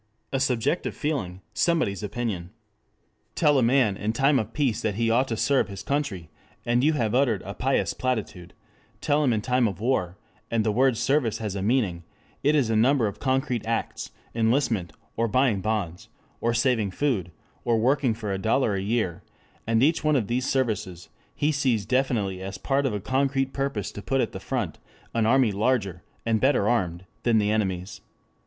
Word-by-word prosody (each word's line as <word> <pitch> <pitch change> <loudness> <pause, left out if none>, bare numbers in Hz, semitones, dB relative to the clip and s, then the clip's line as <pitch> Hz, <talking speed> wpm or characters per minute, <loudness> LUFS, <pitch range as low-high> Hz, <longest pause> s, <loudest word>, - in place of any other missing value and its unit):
A 135 - +1
subjective 130 +5 0
feeling, 100 - -3
somebody's 160 - +1
opinion. 105 -5 -3 0.9
Tell 145 -4 +4
a - - +2
man 120 -4 +3
in 105 +2 -2
time 135 +3 +3
of 110 0 -4
peace 130 -5 0
that 105 -3 -1
he 115 +1 +1
ought 130 +3 +3
to 115 - -3
serve 135 +4 +2
his 100 -2 -8
country 115 - -2 0.3
and 120 +1 +2
you 155 +2 +4
have 115 -7 0
uttered 120 -7 +2
a 100 - -6
pious 135 +4 0
platitude, 110 -8 -3 0.4
Tell 145 +1 +1
him 135 - +3
in 110 -2 0
time 125 +1 +2
of 100 -2 -5
war, 105 -7 0 0.3
and 115 -1 +1
the 105 - +1
word 130 +2 +3
service 120 -1 +1
has 105 -3 -4
a 100 - -3
meaning; 100 -6 +1 0.4
it 145 +2 +3
is 130 -7 +2
a - - +2
number 125 +3 +3
of 100 -1 -4
concrete 130 -3 0
acts, 115 0 -2 0.2
enlistment, 115 -5 +1 0.3
or 115 +1 +2
buying 120 -4 +2
bonds, 100 -5 -3 0.3
or 115 - +1
saving 115 -3 +1
food, 95 - -1 0.3
or 115 -1 +2
working 125 0 +2
for 105 -3 -4
a 95 - -2
dollar 110 +1 +2
a 95 - -1
year, 100 -4 -1 0.5
and 115 +1 +3
each 160 +4 +2
one 155 -1 +3
of 120 -6 +1
these 125 +5 -1
services 105 -9 -2 0.3
he 150 +2 +1
sees 130 -8 +1
definitely 110 -7 0
as 95 0 -5
part 135 +7 0
of 120 - -2
a - - -2
concrete 135 +3 0
purpose 135 -7 -2
to 105 - -8
put 135 +7 0
at 120 - 0
the 95 - -7
front 110 - -3 0.3
an 115 -2 +1
army 125 -2 +4
larger 100 -4 0 0.2
and 115 -1 +1
better 130 -6 +3
armed, 95 -6 0 0.2
than 120 -2 +3
the 105 -1 +2
enemy's. 95 -3 -2
115 Hz, 190 wpm, -25 LUFS, 100-135 Hz, 0.9 s, Tell